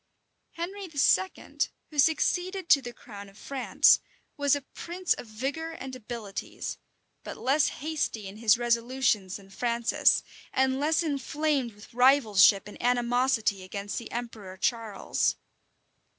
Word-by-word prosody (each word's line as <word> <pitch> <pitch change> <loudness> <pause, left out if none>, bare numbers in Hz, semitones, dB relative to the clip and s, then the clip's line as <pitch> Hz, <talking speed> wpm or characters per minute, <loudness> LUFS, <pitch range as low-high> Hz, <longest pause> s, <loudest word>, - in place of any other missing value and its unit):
[] - - -49
Henry 385 +4 -5
II., 345 +4 +1 0.3
who 300 - -5
succeeded 355 +4 +1
to 280 - +7
the 245 -2 -7
crown 205 -4 -11
of 195 - -19
France, 270 +1 +3 0.4
was 285 -1 +3
a 285 - -4
prince 355 +1 -1
of - - -9
vigor 280 +9 -4
and 265 -5 -7
abilities; 225 -4 -6 0.4
but - - -7
less 285 +3 +2
hasty 290 -9 -3
in 195 +2 -9
his 220 -1 +4
resolutions 235 -4 +1
than 195 -1 -17
Francis, 235 +2 +2 0.3
and 265 0 +1
less 315 +3 +2
inflamed 290 -4 -1
with 205 +2 -16
rivalship 225 -6 +5
and 210 - -11
animosity 245 -4 +1
against 200 +2 -5
the 235 - -10
emperor 220 -6 -6
Charles. 225 -1 0
245 Hz, 135 wpm, -28 LUFS, 215-290 Hz, 0.4 s, to